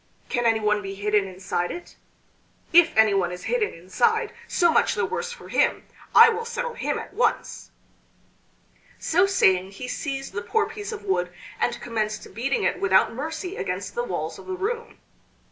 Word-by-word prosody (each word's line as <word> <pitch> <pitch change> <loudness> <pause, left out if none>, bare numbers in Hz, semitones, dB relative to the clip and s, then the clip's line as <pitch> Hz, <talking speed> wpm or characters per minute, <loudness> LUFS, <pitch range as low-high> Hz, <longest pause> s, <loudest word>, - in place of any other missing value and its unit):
Can 240 -1 +1
anyone 210 -2 +2
be 195 -1 -6
hidden 205 0 +1
inside 185 -1 -3
it? 350 - -8 0.8
If 335 -6 +6
anyone 200 -5 +4
is 180 0 -7
hidden 475 -3 0
inside, 315 - 0
so 345 -1 +3
much - - +3
the - - +1
worse 475 0 -3
for 485 - -11
him. - - +1 0.3
I 460 - +11
will 460 0 -2
settle 480 +1 -4
him 475 - -2
at - - -8
once." 445 - -1 1.3
So 365 +4 +2
saying 190 - +3
he 250 +6 -7
seized 270 -1 -4
the 205 - -3
poor 420 - 0
piece 430 -1 -6
of 440 - -7
wood 180 -1 0 0.3
and - - 0
commenced 215 -4 -3
beating 250 +6 -1
it - - 0
without 190 +1 +4
mercy 320 - -5
against - - -3
the 480 - -1
walls - - -4
of - - -13
the 375 - -3
room. 460 +5 -4
270 Hz, 170 wpm, -25 LUFS, -, 1.3 s, I